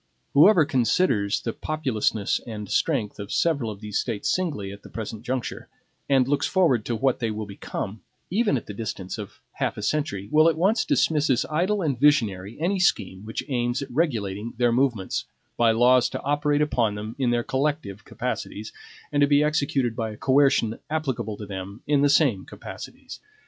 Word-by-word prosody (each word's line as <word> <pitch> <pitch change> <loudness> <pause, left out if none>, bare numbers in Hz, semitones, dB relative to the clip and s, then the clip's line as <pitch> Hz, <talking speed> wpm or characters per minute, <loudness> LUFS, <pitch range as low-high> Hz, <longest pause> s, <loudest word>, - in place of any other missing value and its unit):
Whoever 160 +3 +7
considers 120 - +1
the 115 - -3
populousness 125 -9 -1
and 105 -3 -6
strength 110 - 0
of 100 0 -6
several 145 -9 +1
of 105 -1 -8
these 105 -1 -2
States 110 -5 -1
singly 145 - -2
at 100 0 -10
the - - -13
present 110 -1 -6
juncture, 125 0 -4 0.4
and 135 -2 +4
looks 145 +1 +1
forward 145 - +2
to 120 - -1
what 130 +3 +1
they 115 - -1
will 110 0 -4
become, 100 +1 -6 0.3
even 205 - +2
at - - -6
the 105 - -7
distance 100 -2 -5
of 105 - -9
half - - -2
a 105 - -5
century, 105 -6 -1
will 155 +2 +6
at 160 - -1
once 200 +7 +2
dismiss 150 -2 +2
as 125 -3 +2
idle 185 +6 +1
and 140 -6 -1
visionary 110 -9 +2
any 185 +4 0
scheme 100 - +1
which 110 - -4
aims 120 0 -1
at 135 - -10
regulating 115 - -1
their 120 -1 +3
movements 120 -6 0 0.3
by 120 -1 +3
laws 125 +2 +4
to - - -5
operate 145 +1 +1
upon 115 -8 0
them 105 +2 -6
in 130 -3 +2
their 120 0 +1
collective 130 -8 -2
capacities, 105 +2 -5 0.4
and 145 -1 +1
to 145 - +6
be 145 +1 +4
executed 140 -5 0
by 115 -1 -2
a 105 - -9
coercion 135 -4 +3
applicable 135 -9 -2
to 105 - -7
them 100 +2 -7
in 145 -1 +2
the 145 - +4
same 140 - +3
capacities. - - -10
125 Hz, 185 wpm, -25 LUFS, 105-145 Hz, 0.4 s, Whoever